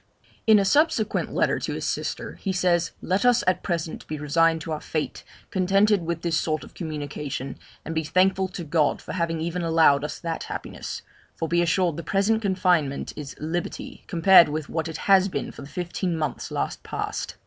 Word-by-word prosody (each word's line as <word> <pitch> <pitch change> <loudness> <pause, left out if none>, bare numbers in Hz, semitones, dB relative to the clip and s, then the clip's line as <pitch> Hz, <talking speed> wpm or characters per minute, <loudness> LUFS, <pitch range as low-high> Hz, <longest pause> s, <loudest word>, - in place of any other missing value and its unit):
In 220 -1 +8
a 200 - +3
subsequent 235 -2 +2
letter - - +1
to - - -3
his - - -4
sister, - - -3
he 195 - -1
says, 180 -2 +2
'Let 185 +5 +1
us 245 -1 +4
at 185 0 +2
present 170 -3 -3
be 155 - -4
resigned 160 +2 +2
to 160 - -6
our 155 - -3
fate, 155 -2 -3 0.3
contented 195 +1 +3
with 170 -1 -2
this 165 -1 +1
sort 155 -1 -1
of - - -13
communication, 145 -4 -5 0.3
and 165 - -4
be 160 0 0
thankful 190 +4 +2
to 180 -1 -7
God 155 -1 +1
for - - -8
having 170 -2 -1
even 170 +2 -2
allowed 160 -4 +4
us 150 - -4
that 165 -1 -4
happiness - - -6 0.3
for 165 - -2
be 170 +1 +2
assured 170 -1 +1
the 170 - -5
present 205 +3 +1
confinement 180 -8 +1
is 145 -2 -7
liberty, 165 +3 -4
compared 170 -1 +7
with 155 0 -4
what 160 0 -2
it 160 -1 -5
has 195 -1 +6
been 185 - -3
for - - -11
the 140 - -9
fifteen 175 0 -2
months 150 -5 -3
last - - -3
past.' - - -4
170 Hz, 190 wpm, -25 LUFS, 155-185 Hz, 0.3 s, In